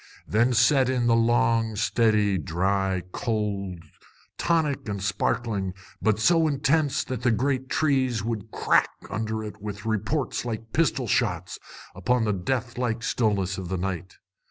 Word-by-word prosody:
Then 115 +4 +2
set 130 +3 +4
in 125 -2 +1
the 115 -1 +4
long, 115 -1 +2
steady, 105 -3 +2
dry 95 +4 0
cold, 100 -6 -2 0.5
tonic 150 -8 0
and 100 -1 -3
sparkling, 100 -1 -1 0.3
but 110 -2 +2
so 165 +7 +4
intense 145 0 +1
that 130 -3 -5
the 125 - +2
great 130 +3 0
trees 130 -7 +1
would 110 -1 -3
crack - - +2 0.2
under 110 +1 -2
it 105 -1 -8
with 105 -1 -6
reports 115 +6 -1
like 115 -2 -5
pistol 145 -5 +1
shots 90 -9 0 0.3
upon 115 +6 +1
the 105 -1 +1
death 120 +6 -2
like 115 -2 -1
stillness 100 -5 0
of 90 -2 -6
the 95 - -1
night. 95 0 -4
110 Hz, 145 wpm, -26 LUFS, 100-125 Hz, 0.5 s, set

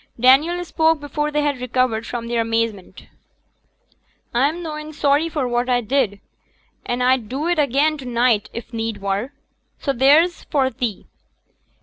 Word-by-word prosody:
Daniel 305 +9 +4
spoke 320 -1 +2
before 295 +1 -2
they 295 0 0
had 285 -4 -1
recovered 250 -2 0
from 235 -1 -4
their 235 -1 0
amazement. 225 -4 -3 1.3
'A'm 290 +8 +1
noane 305 -1 -6
sorry 290 +2 +2
for 290 -5 -2
what 240 +1 -1
a 245 -1 +3
did, 235 -4 0 0.7
an' 245 +1 -1
a'd 250 -4 +2
do 285 +5 -2
it 350 -2 +1
again 295 +2 +2
to 265 - -9
neet, 235 -3 +1
if 235 +1 -8
need 225 -2 -3
were. 200 +6 -2 0.5
So 275 - -2
theere's 295 +7 +4
for 265 -3 +1
thee. 240 -8 -4
260 Hz, 150 wpm, -21 LUFS, 235-295 Hz, 1.3 s, Daniel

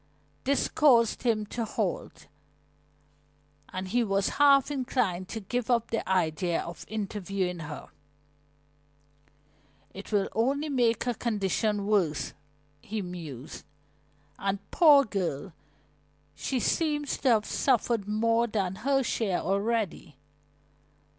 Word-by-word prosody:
This 280 +1 +2
caused 240 -7 +4
him 220 -3 +1
to 235 - -1
halt, 220 - -3 1.5
and 185 0 -4
he 240 +4 +2
was 195 -2 +1
half 280 -1 +6
inclined 240 -9 -1
to 225 - -4
give 245 +4 -3
up 235 -2 +1
the 225 - -2
idea 170 -1 +1
of 170 - -7
interviewing 195 -4 -3
her, 150 -2 -7 2.0
"It 195 +3 -9
will 200 -2 +2
only 275 +7 0
make 240 -4 +2
her 245 - 0
condition 210 -2 -1
worse," 190 -8 +1 0.5
he 215 -1 -4
mused. 160 -8 -8 0.8
"And, 195 0 0
poor 295 -5 +7
girl, 185 - -3 0.8
she 260 - -2
seems 295 +1 0
to 265 - +2
have 220 -3 +3
suffered 235 -5 +1
more 230 +2 +2
than 195 -4 -2
her 270 +2 +1
share 210 -6 0
already. 200 - -1
215 Hz, 115 wpm, -28 LUFS, 190-245 Hz, 2.0 s, poor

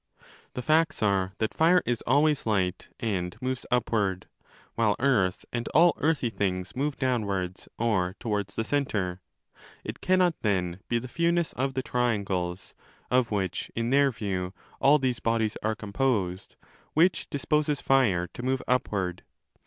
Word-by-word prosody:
The 125 - -4
facts 155 -2 +2
are 95 -2 +1
that 110 0 -1
fire 175 +2 +4
is 120 -2 -1
always 150 -3 +3
light 95 -4 0
and 90 -6 -2
moves 130 -1 -3
upward, 105 -6 0 0.5
while 110 -3 +2
earth 105 -9 +1
and 120 -1 -2
all 170 +2 +7
earthy 145 -6 +1
things 90 -3 -2
move 140 +2 -1
downwards 100 -8 -1
or 100 -6 +1
15 - - -31
towards 105 -3 -2
the 110 - 0
centre. 105 -10 -1 0.6
It - - -7
cannot 185 -2 +3
then 90 -4 0
be 120 - +2
the 120 +2 -4
fewness 170 +4 +1
of 135 +1 -2
the 130 - -1
triangles 100 -8 -1 0.4
(of 125 -2 +3
which, 95 -4 -2
in 115 +1 -1
their 140 0 +5
view, 95 -5 -3 0.2
all 145 +2 +6
these 130 -4 -1
bodies 115 -2 0
are 110 +1 0
com 105 -2 -9
posed) 100 -9 -1 0.2
* - - -32
which 170 +3 +3
disposes 150 0 0
fire 110 -10 +3
to - - -7
move 130 +1 -1
upward. 95 -8 0
115 Hz, 155 wpm, -27 LUFS, 95-135 Hz, 0.6 s, all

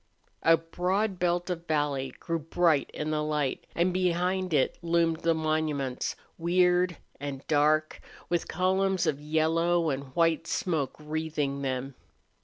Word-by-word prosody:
A 165 0 +6
broad 185 +4 -1
belt 175 +1 0
of 170 -1 -5
valley 145 -4 0
grew 165 -1 -2
bright 160 -1 +2
in 150 +1 -3
the 155 0 0
light, 150 -3 -1
and 175 +2 +2
behind 185 +1 0
it 145 -4 +1
loomed 165 -1 +1
the 165 -1 +2
monuments, 155 -4 -1 0.2
weird 180 0 +3 0.2
and 140 -1 -6
dark, 155 +1 +2 0.3
with 175 -1 -1
columns 190 +1 +1
of 150 -3 0
yellow 165 +2 +2
and 135 +1 -3
white 165 -2 +2
smoke 155 -7 -1
wreathing 150 -2 -2
them. 135 0 -3
160 Hz, 135 wpm, -28 LUFS, 150-175 Hz, 0.3 s, A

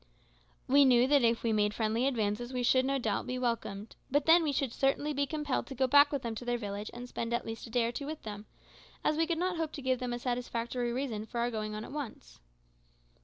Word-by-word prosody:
We 280 +2 +6
knew 250 -2 +5
that 285 +1 +4
if 230 0 +2
we 230 -1 +1
made 210 -1 +1
friendly 225 +3 +1
advances 230 -1 -1
we 250 -1 -2
should 260 +1 +4
no 275 +1 +1
doubt 220 -3 -1
be 250 0 -2
welcomed, 230 -4 -3
but 290 +1 +2
then 330 +2 +7
we 310 -3 0
should 270 -3 -1
certainly 285 +2 +1
be 280 0 0
compelled 295 -2 -2
to 270 - -7
go 260 +1 +2
back 285 +3 +6
with 280 -3 -2
them 230 -1 -2
to - - -6
their 245 0 0
village 205 -2 -5
and 245 +1 -8
spend 235 -1 -2
at - - -3
least 225 +1 -6
a - - -12
day 235 0 +1
or 230 - -1
two 280 +3 -5
with 310 0 -6
them, 210 -1 -7 0.6
as 305 - +2
we 325 +1 +1
could 335 -1 0
not 360 0 -1
hope 320 -2 -2
to 285 - -6
give 260 -1 +1
them 250 -1 -3
a - - -2
satisfactory 240 0 -2
reason 235 -4 -3
for 235 - -7
our 240 +1 0
going 215 -1 -3
on 215 +1 -5
at - - -10
once. 260 - -7
245 Hz, 255 wpm, -31 LUFS, 230-280 Hz, 0.6 s, then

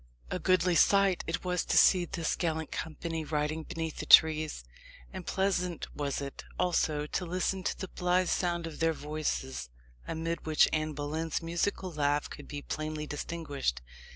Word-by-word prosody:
A - - -1
goodly 185 -1 +3
sight 195 +2 +4
it 165 - -2
was 180 -1 0
to - - +1
see 180 -2 +6
this 165 -1 -2
gallant 160 -2 -2
company 160 0 -4
riding 150 +1 -1
beneath 160 0 -5
the - - -5
trees; 155 - +6 0.5
and - - -7
pleasant 180 -3 -1
was 145 -1 -2
it, 140 -1 -6
also, 160 -4 +1
to 165 - -2
listen 185 +2 -1
to - - -2
the 190 - -5
blithe 180 +1 +1
sound 175 -2 0
of 160 -2 -7
their 165 0 +2
voices, 150 - -3 0.4
amid 165 +1 -3
which 155 -1 +4
Anne 155 0 0
Boleyn's 155 +3 -3
musical 175 +3 -1
laugh 145 -1 0
could - - -9
be 145 -1 -6
plainly 155 0 -4
distinguished. 145 - -3
160 Hz, 160 wpm, -30 LUFS, 150-175 Hz, 0.5 s, see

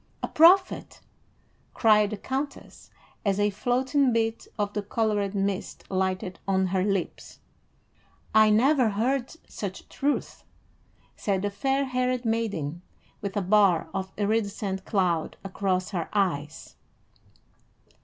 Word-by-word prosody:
"A - - 0
prophet!" 365 +4 +4 0.8
cried 210 -2 +4
the 215 - -4
countess, 270 +6 -5 0.3
as 200 -1 +1
a 205 0 +2
floating 255 +6 +1
bit 225 0 -1
of 205 -1 -1
the 210 - -1
colored 205 -1 -1
mist 195 0 -2
lighted 185 -1 -1
on 190 -1 +2
her 185 0 0
lips. 195 -3 -3 1.0
"I 215 0 +6
never 250 +3 +4
heard 245 +7 -1
such 195 -2 -6
truth," 290 +1 -2 0.7
said 195 -2 -1
the 205 - -1
fair 270 +7 0
haired 255 -1 -1
maiden, 200 -9 -2 0.4
with 200 0 -4
a 200 - 0
bar 195 -3 +3
of 190 -1 -3
iridescent 200 -2 -1
cloud 180 -5 0
across 190 -1 -1
her 175 -5 -3
eyes. 160 -8 -2
205 Hz, 120 wpm, -26 LUFS, 190-230 Hz, 1.0 s, I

